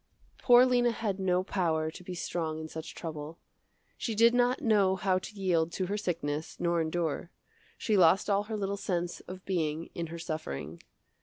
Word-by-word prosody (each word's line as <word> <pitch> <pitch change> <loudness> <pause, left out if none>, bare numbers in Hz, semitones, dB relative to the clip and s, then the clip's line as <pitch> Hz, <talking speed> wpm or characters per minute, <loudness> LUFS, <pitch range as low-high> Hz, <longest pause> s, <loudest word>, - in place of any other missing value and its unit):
Poor 245 0 +7
Lena 245 -1 +3
had 215 -4 -2
no 185 -1 +2
power 160 -5 0
to 180 - -11
be 180 0 -6
strong 160 -2 -3
in 160 - -5
such 160 0 -8
trouble. 155 -1 -6 0.6
She 225 - -2
did 230 +2 +6
not 245 +1 +3
know 200 -4 +4
how 190 -1 +1
to 210 - -10
yield 170 -4 +1
to 185 - -1
her 200 +3 -2
sickness 160 -6 -3
nor 170 -1 +1
endure. 165 0 -2 0.5
She 220 - 0
lost 185 +1 +5
all 205 0 +2
her 220 0 -4
little 200 0 -2
sense 175 -3 -2
of 185 0 -9
being 165 -4 -2
in 170 -1 -4
her 170 +1 -7
suffering. 85 - -5
180 Hz, 180 wpm, -30 LUFS, 160-200 Hz, 0.6 s, Poor